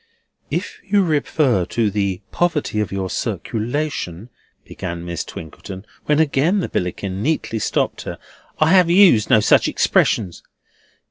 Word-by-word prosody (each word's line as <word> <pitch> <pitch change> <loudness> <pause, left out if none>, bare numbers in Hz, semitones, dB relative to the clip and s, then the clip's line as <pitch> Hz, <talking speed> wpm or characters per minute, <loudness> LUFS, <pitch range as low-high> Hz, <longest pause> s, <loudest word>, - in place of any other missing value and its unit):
"If - - -4
you 200 0 +2
refer 145 - +1
to 110 +3 0
the 100 -2 -1
poverty 160 -10 0
of 105 - -1
your 95 -1 -2
circulation," 115 - -3 0.3
began 85 0 -6
Miss 85 -1 -3
Twinkleton, 95 +5 -9 0.2
when 150 - +2
again 160 +5 +2
the 185 - -2
Billickin 95 +2 -3
neatly 125 -4 -1
stopped - - -1
her. - - -5 0.4
"I 155 +1 +3
have 185 -3 +5
used 175 - +5
no 110 - +5
such - - +4
expressions." 95 -6 +1
115 Hz, 135 wpm, -20 LUFS, 95-155 Hz, 0.4 s, have